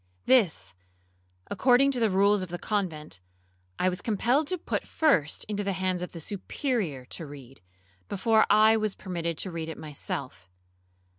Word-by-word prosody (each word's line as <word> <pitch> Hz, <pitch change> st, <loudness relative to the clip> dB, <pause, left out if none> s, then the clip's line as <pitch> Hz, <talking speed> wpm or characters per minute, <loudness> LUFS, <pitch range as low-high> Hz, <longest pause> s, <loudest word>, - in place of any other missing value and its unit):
This, 160 Hz, -, +3 dB, 0.8 s
according 255 Hz, +6 st, +4 dB
to 255 Hz, -, +1 dB
the 225 Hz, -2 st, +3 dB
rules 200 Hz, +1 st, +3 dB
of 185 Hz, -, -5 dB
the 175 Hz, -, -4 dB
convent, 165 Hz, -, -3 dB, 0.6 s
I 185 Hz, -, +1 dB
was 180 Hz, 0 st, -1 dB
compelled 240 Hz, +7 st, +1 dB
to 365 Hz, -, 0 dB
put -, -, -3 dB
first 185 Hz, -, +1 dB
into 205 Hz, -1 st, -3 dB
the 195 Hz, 0 st, -1 dB
hands 185 Hz, -1 st, -1 dB
of 180 Hz, -, -5 dB
the 170 Hz, -, -8 dB
Superior 195 Hz, -, -3 dB
to 165 Hz, -, -2 dB
read, 135 Hz, -2 st, -12 dB, 0.5 s
before 220 Hz, +2 st, +3 dB
I 215 Hz, +2 st, +6 dB
was 215 Hz, -2 st, -1 dB
permitted 170 Hz, -3 st, -4 dB
to 190 Hz, -, -2 dB
read 165 Hz, -1 st, -4 dB
it 160 Hz, -, -6 dB
myself. 145 Hz, -, -6 dB
190 Hz, 160 wpm, -27 LUFS, 165-220 Hz, 0.8 s, I